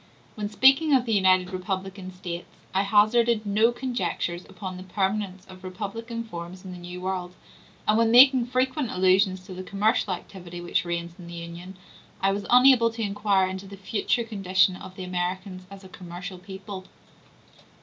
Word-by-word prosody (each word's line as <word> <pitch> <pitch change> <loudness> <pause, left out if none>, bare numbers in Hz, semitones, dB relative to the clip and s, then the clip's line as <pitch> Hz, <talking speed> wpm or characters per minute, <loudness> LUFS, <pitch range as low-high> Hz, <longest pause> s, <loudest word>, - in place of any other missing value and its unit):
When 210 -1 -4
speaking 270 +7 +5
of 255 -2 +2
the 225 - 0
united 185 -2 +3
republican 190 0 -4
States, 175 -1 -6 0.3
I 190 - +3
hazarded 215 +2 +3
no 215 +3 +3
conjectures 240 -8 -3
upon 185 -3 -7
the - - -8
permanence 190 0 -2
of 185 0 -14
republican 225 +5 -5
forms 180 -2 -8
in 185 - -7
the 180 - -8
New 175 +1 -8
World, 180 -1 -4 0.5
and 215 +1 +4
when 230 -1 +4
making 250 +1 +7
frequent 255 +1 0
allusion 185 +1 +3
to 185 +1 -11
the 185 - -6
commercial 200 +2 +1
activity 175 -1 -7
which 175 0 -1
reigns 170 0 -3
in 175 - -10
the 170 - -8
Union, 170 +2 -8 0.4
I 195 - +2
was 200 0 -3
unable 250 -1 +6
to 230 0 -3
inquire 200 -2 +1
into 190 +1 -6
the 200 0 -10
future 205 +4 -1
condition 190 -4 +2
of 185 0 -10
the 185 - -6
Americans 185 +1 -4
as 195 0 -12
a - - -11
commercial 180 +1 -8
people. 190 0 -8
190 Hz, 170 wpm, -26 LUFS, 185-215 Hz, 0.5 s, making